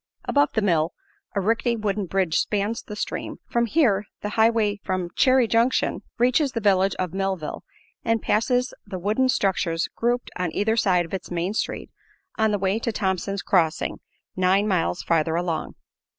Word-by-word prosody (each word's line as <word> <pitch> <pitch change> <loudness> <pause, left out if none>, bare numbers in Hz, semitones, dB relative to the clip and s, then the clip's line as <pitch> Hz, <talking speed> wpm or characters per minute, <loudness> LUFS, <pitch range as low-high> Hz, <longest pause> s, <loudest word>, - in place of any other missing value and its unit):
Above 285 0 +3
the 220 - +1
mill 165 -5 +2 0.4
a - - +2
rickety 230 +4 +1
wooden 210 -3 -2
bridge 185 -3 +1
spans 210 +2 -1
the 210 - -8
stream, - - -4
for 235 0 +1
here 225 -7 +2 0.2
the 210 - -3
highway 220 -1 +2
from 185 -2 -2
Chary 255 -2 +4
Junction 230 +3 +1 0.2
reaches 255 +3 +2
the 230 - -1
village 195 -2 +3
of 180 -2 -3
Millville 190 -5 -3 0.4
and 225 0 +1
passes 245 +5 +1
the 195 -2 -6
wooden 215 +8 +1
structures 175 -7 +1
grouped 240 +1 -1
on 180 -2 -2
either 220 +2 +1
side 180 -6 +1
its 190 - -4
main 175 +3 -2
street - - -3 0.4
on 220 0 +2
the 210 - +1
way 195 +2 0
to 230 - -1
Thompson's 195 -1 -2
Crossing, 165 -4 +1 0.4
nine 185 +3 +3
miles 180 -3 0
farther 160 -1 +1
along. 170 -2 -2
200 Hz, 165 wpm, -24 LUFS, 185-230 Hz, 0.4 s, Chary